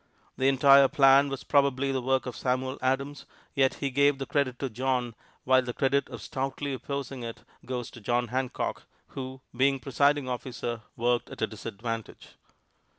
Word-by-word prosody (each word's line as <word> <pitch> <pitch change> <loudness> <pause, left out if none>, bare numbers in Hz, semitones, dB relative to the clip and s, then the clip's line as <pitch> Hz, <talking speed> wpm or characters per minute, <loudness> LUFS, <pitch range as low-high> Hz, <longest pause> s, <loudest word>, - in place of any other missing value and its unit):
The 130 - +1
entire 135 0 +7
plan 135 +1 +5
was 135 -1 -5
probably 140 -1 +2
the 130 -1 -1
work 130 +1 +1
of 125 - -5
Samuel 130 +1 -1
Adams, 140 +2 -1 0.3
yet 135 -2 +2
he 140 -1 -3
gave 140 +1 +3
the 135 - -4
credit 140 -4 0
to 135 - -2
John, 125 0 -1 0.3
while 130 0 +5
the 125 -1 -5
credit 140 0 +1
of 115 -4 -8
stoutly 135 +1 -3
opposing 135 -1 -5
it 115 -1 -7 0.2
goes 125 -2 -4
to 120 - -12
John 120 +2 0
Hancock, 130 +1 -3 0.2
who, 130 0 -7
being 135 +1 +3
presiding 140 +1 +2
officer, 120 -2 -4
worked 120 +1 0
at - - -5
a - - +5
disadvantage. 115 +1 -6
130 Hz, 165 wpm, -28 LUFS, 125-140 Hz, 0.3 s, entire